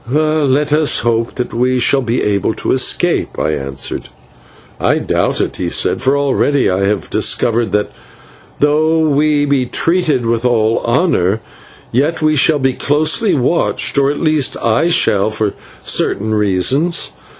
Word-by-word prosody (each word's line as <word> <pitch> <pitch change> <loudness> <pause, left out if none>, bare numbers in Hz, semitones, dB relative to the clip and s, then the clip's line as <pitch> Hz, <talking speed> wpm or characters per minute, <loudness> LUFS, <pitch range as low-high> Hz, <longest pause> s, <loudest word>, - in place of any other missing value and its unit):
"Let 150 -1 +1
us 150 -1 +2
hope 115 0 -1
that 125 -2 -4
we 125 +2 +1
shall 135 +3 +2
be 120 -1 -1
able 100 -2 0
to - - -3
escape," - - 0
I - - -1
answered. 70 -2 -5 0.7
"I - - +1
doubt - - -1
it," - - -2
he - - -3
said, - - 0
"for 135 +2 +1
already 140 -2 +1
I 95 +1 0
have 105 - -2
discovered 115 0 +1
that, 105 0 0 0.7
though 155 +2 +2
we 145 0 +2
be 140 -3 0
treated 160 -5 0
with 115 0 -1
all 115 -2 +1
honour, 115 - +1 0.5
yet 145 +7 0
we 155 0 +1
shall 150 +2 +3
be 130 -2 0
closely 155 - +1
watched, 140 +5 0
or 140 -1 +2
at 145 - -3
least 155 -4 0
I 115 +8 +1
shall, 105 - +2
for 110 -2 -2 0.3
certain 110 +2 0
reasons. 105 - +1
130 Hz, 150 wpm, -15 LUFS, 115-150 Hz, 0.7 s, shall